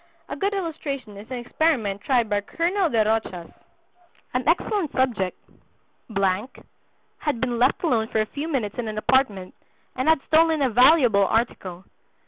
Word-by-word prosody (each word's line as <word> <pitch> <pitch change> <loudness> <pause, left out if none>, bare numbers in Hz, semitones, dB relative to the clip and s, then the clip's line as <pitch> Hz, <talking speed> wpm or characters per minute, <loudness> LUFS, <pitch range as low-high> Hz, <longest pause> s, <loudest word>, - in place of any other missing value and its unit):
A - - -4
good 400 +1 -1
illustration 290 - -5
is 205 +2 -11
an 255 - -4
experiment 240 -6 0
tried 245 -5 +1
by 205 -1 0
Colonel 345 - 0
de 225 -5 +2
Rochas: 215 -6 -2 0.8
"An 250 +1 -2
excellent 345 0 +1
subject 235 -9 0 1.8
had 295 -6 -2
been 240 -1 -1
left 255 +7 +2
alone 230 -9 +1
for 220 - -1
a 215 - +2
few 285 +7 -6
minutes 245 -9 -3
in 235 - -3
an 215 0 -5
apartment, 215 -6 +1 0.4
and 260 +4 0
had 320 -3 +3
stolen 320 -2 +3
a 260 - +1
valuable 245 -5 +5
article. 190 -5 -2
250 Hz, 150 wpm, -24 LUFS, 215-310 Hz, 1.8 s, valuable